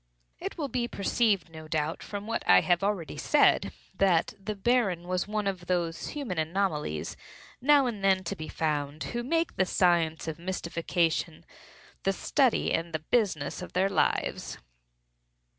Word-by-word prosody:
It - - -5
will 300 -4 -2
be 245 -2 -1
perceived, 200 -4 +1
no 160 -1 -10
doubt, 155 +1 -1
from 205 0 -6
what 230 +1 -2
I - - +8
have 175 0 +2
already 190 -7 -1
said, 290 - +3 0.2
that 180 -4 +2
the 215 +1 -3
Baron 195 -5 +1
was 185 +1 -1
one 210 0 -2
of 185 -3 -3
those 170 -2 -1
human 255 - -4
anomalies 155 - -1 0.5
now 285 +1 +5
and 220 -5 -3
then 190 -1 +3
to 170 - -3
be 155 0 -7
found, 150 -2 -2
who 240 - -1
make 330 +6 -1
the 190 - +3
science 170 -4 +2
of 160 0 -4
mystification 170 -2 -1 0.6
the 195 - +1
study 260 +5 +2
and 165 0 -1
the 155 -1 -3
business 185 -13 +1
of 180 - -8
their 190 +2 +2
lives. 195 - 0
185 Hz, 160 wpm, -28 LUFS, 165-210 Hz, 0.6 s, I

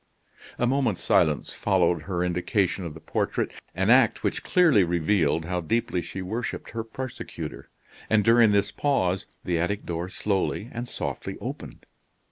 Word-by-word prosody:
A 120 - +1
moment's 125 -6 +1
silence 75 -2 +2
followed 90 -4 +2
her 90 -2 -2
indication 90 +1 0
of 80 -3 -6
the - - -9
portrait 80 - -1 0.2
an 95 +5 +2
act 125 -3 +4
which - - -1
clearly 165 - +4
revealed 85 -2 +1
how 90 +1 -1
deeply 90 +1 0
she 95 +3 -6
worshiped 110 +6 -4
her 115 0 -3
persecutor; 130 +3 -7 0.4
and 110 -1 +4
during 115 -1 +6
this 100 0 +2
pause 95 -11 0 0.2
the 85 -2 0
attic 100 +4 -1
door 85 +1 -3
slowly 100 +3 -1
and 120 +1 -4
softly 70 -6 -4
opened. - - -7
95 Hz, 150 wpm, -26 LUFS, 85-115 Hz, 0.4 s, during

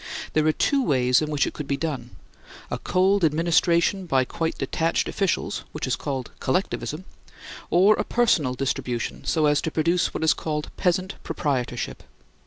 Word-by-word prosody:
There 155 0 +2
are - - +5
two 275 - +1
ways 125 - +3
in 155 - -2
which 150 -2 +1
it - - -4
could 150 - -6
be 140 - 0
done, 140 -7 -3 0.6
a - - -2
cold 190 +1 +2
administration 170 +4 +2
by 130 -4 +2
quite 160 +5 -3
detached 165 +4 0
officials, 195 -4 -1
which - - -3
is - - 0
called 135 -3 -4
Collectivism, 150 +1 -2 0.6
or 190 +5 +5
a - - 0
personal 165 - +2
distribution, 125 -2 -3
so 155 -2 +2
as 145 0 +3
to - - -2
produce 170 +3 +1
what - - -4
is 160 - +5
called 150 -1 -4
Peasant 185 +1 -1
Proprietorship. 125 -4 -2
155 Hz, 165 wpm, -24 LUFS, 135-175 Hz, 0.6 s, are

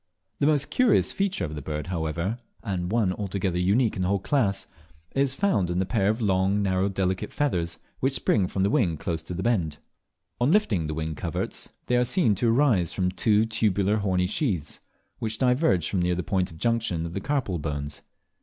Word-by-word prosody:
The 140 - +3
most 145 -2 +2
curious 250 -4 +3
feature 195 - -1
of 75 - -6
the 75 - -5
bird, 75 +2 -4
however, 85 +5 -2 0.2
and 95 -4 -2
one 110 -5 +2
altogether 95 -2 -2
unique 105 +6 +2
in 95 - -3
the 90 - +1
whole 100 +1 +2
class, 100 -2 0 0.5
is 135 -1 +1
found 135 - +1
in 90 - -1
the 95 - +1
pair 100 -2 +1
of 110 +2 0
long 100 -1 +2
narrow 95 0 +1
delicate 95 -1 -1
feathers 90 - -1 0.2
which 135 +1 +1
spring 105 -5 +2
from 95 +1 0
each 100 - +1
wing 95 - +2
close 80 +1 -3
to 85 +3 -6
the 90 - -3
bend. 90 -11 0 0.6
On 125 +5 +3
lifting 110 - +2
the 75 - -3
wing 80 0 -3
coverts - - -4 0.2
they 125 - +2
are 125 - +4
seen 125 - +2
to 115 +4 +1
arise 115 - +3
from 90 -2 0
two 105 +3 +3
tubular 105 -2 +1
horny 95 -3 +1
sheaths, 90 - -2 0.4
which 110 -1 -2
diverge 125 - +2
from 95 - 0
near 90 0 +1
the 90 - -2
point 95 -2 0
of 80 - -12
junction 115 -6 0
of 85 - -6
the 100 - -3
carpal 130 - -1
bones. 70 -1 -4
95 Hz, 200 wpm, -26 LUFS, 90-115 Hz, 0.6 s, are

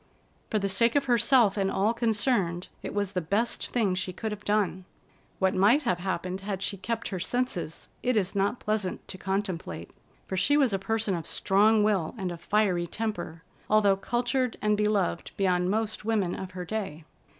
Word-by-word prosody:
For 215 - +1
the 200 -1 0
sake 230 +6 +2
of 285 -1 +3
herself 240 -3 +4
and 195 -1 +1
all 205 +4 +1
concerned, 215 -6 +1
it - - -5
was 200 -2 0
the 180 - -1
best 205 +8 -1
thing 215 -6 +1
she 185 0 -2
could 220 +4 -4
have 210 -1 -6
done. 205 -3 0 0.5
What 190 0 +2
might 215 +11 +4
have 180 - 0
happened 185 0 -3
had 195 -1 -3
she - - -1
kept 230 +4 -3
her 185 - -4
senses, 185 -5 -2
it 250 -2 +1
is 195 -2 +1
not 200 +5 0
pleasant 210 -3 -2
to 185 - -5
contemplate, 185 - -3 0.3
for 190 - -4
she 255 +11 +3
was 265 -7 +3
a 195 - +1
person 220 0 0
of 170 -2 -3
strong 210 +2 +3
will 200 -5 +1
and 190 -3 -3
a 170 - -6
fiery 180 -2 +1
temper, 175 -5 -4 0.3
although 210 -2 +5
cultured 245 +4 -1
and 210 0 +2
beloved 210 -4 0
beyond 180 -2 +2
most 220 +1 -1
women 210 -5 0
of 185 -1 -6
her 180 - -4
day. 175 -6 -4
200 Hz, 185 wpm, -28 LUFS, 185-220 Hz, 0.5 s, although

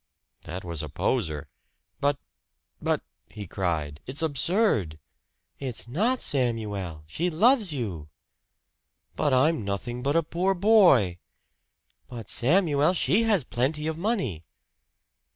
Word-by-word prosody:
That 90 +3 -6
was 85 -3 -2
a 75 - -6
poser. 80 - -1 0.5
"But 145 0 +1 0.6
but - - 0
" - - -47
he 105 - -5
cried. 80 -5 -3
"It's 140 +5 -1
absurd!" 150 - +1 0.6
"It's 130 -4 -5
not, 220 - 0
Samuel! 105 - -1
She 165 - -2
loves 215 - +3
you!" 100 - -4 1.1
"But 145 - +1
I'm 130 0 +3
nothing 100 +5 -4
but 140 +4 0
a 165 - +3
poor 180 +5 0
boy!" 175 - +5 0.9
"But, 115 -4 -8
Samuel, 155 +3 +3
she 215 +6 +2
has 205 -9 +2
plenty 135 +6 -1
of 160 0 -1
money!" 165 - -2
130 Hz, 120 wpm, -26 LUFS, -, 1.1 s, boy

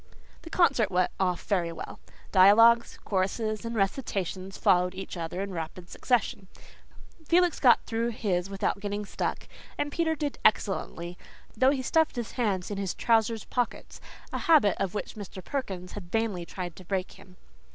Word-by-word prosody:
The 330 - -10
concert 275 - +3
went 180 -1 +1
off 180 -2 0
very 175 -5 0
well. 165 - -8 0.3
Dialogues, 230 +5 +6
choruses 215 +3 -1
and 230 0 -4
recitations 195 -3 -2
followed 180 -2 +3
each 190 0 -6
other 170 +2 -4
in 200 - -5
rapid 170 +1 -6
succession. 215 -5 0 0.8
Felix 345 +1 +3
got 245 -4 +5
through 230 +1 -1
his 195 -5 -1
without 195 0 -1
"getting 205 0 -3
stuck," - - -3 0.3
and 290 - -1
Peter 320 0 0
did 295 -2 -3
excellently, 180 -4 0 0.4
though 255 +4 +4
he 270 -2 0
stuffed 320 +4 +2
his 235 -4 -4
hands 205 -6 -1
in 200 - -3
his 195 -3 -2
trousers 225 -1 +2
pockets 245 -2 -3 0.3
a - - -1
habit 295 - +4
of 195 0 -2
which - - -4
Mr. 195 -3 -9
Perkins 190 -10 -4
had 175 -4 -9
vainly 210 -6 -1
tried 180 -3 -6
to 185 - -10
break 185 +1 -2
him. 185 -2 -16
205 Hz, 160 wpm, -28 LUFS, 185-235 Hz, 0.8 s, Dialogues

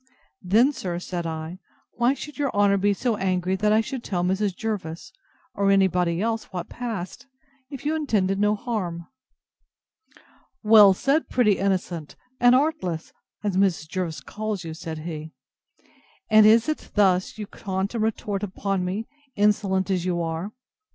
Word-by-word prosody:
Then, 220 +10 +4
sir, 180 -9 -4
said 175 -1 -4
I, 160 +2 -5 0.3
why 240 +3 +1
should 295 +1 -9
your 280 -2 0
honour 200 -1 +4
be 205 +1 +2
so 220 +2 -1
angry 185 -1 0
I 215 +1 +4
should 255 +2 -6
tell 175 -3 -2
Mrs. 190 +1 0
Jervis, 185 -7 -5 0.4
or 200 0 +1
any 195 -1 +5
body 180 0 0
else, 225 0 -1
what 180 -3 -6
passed, 225 -4 -6 0.4
if 275 -1 -9
you 310 +2 +1
intended 200 -11 0
no 210 +1 +3
harm? 185 -7 -4 1.6
Well 210 -3 +8
said, 280 +9 +1
pretty 215 -6 +2
innocent 180 -5 -2 0.2
and 245 +1 +6
artless! 255 - -1 0.3
as 200 -3 -1
Mrs. 185 -5 +1
Jervis 170 -2 -3
calls 215 -3 -4
you, 165 -1 -6
said 160 0 -6
he; 155 -2 -6 1.0
and 215 0 +8
is 225 +3 +5
it 310 - -4
thus 190 -2 +2
you 210 - -5
taunt 190 +1 -4
and 225 -2 -1
retort 210 -2 -2
upon 195 -1 -2
me, 195 +5 -3 0.3
insolent 200 -2 +1
as 180 -2 0
you 175 -1 -1
are! 165 +5 -4
195 Hz, 155 wpm, -24 LUFS, 180-220 Hz, 1.6 s, Well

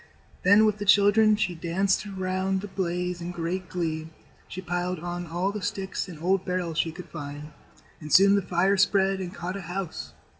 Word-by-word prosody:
Then, 205 +4 +6
with 215 -1 +1
the 205 - -3
children, 210 +2 +5
she 200 -4 -1
danced 185 +4 0
round 190 0 -1
the 205 - -6
blaze 180 -2 -2
in 170 - -4
great 180 +1 -4
glee. 160 -3 -3 0.4
She 185 - -7
piled 180 0 -2
on 175 +1 -5
all 175 +4 -1
the 210 0 -5
sticks 195 0 -3
and 170 -4 -10
old 190 +1 +2
barrels 180 -3 -2
she 165 - +1
could 175 +3 -10
find, 145 0 -7 0.5
and 150 -1 -9
soon 195 +1 +7
the 200 - +3
fire 185 +2 +1
spread 195 0 +3
and 180 -1 -5
caught 180 +1 -5
a - - -6
house. 180 -1 -5
185 Hz, 190 wpm, -26 LUFS, 175-195 Hz, 0.5 s, soon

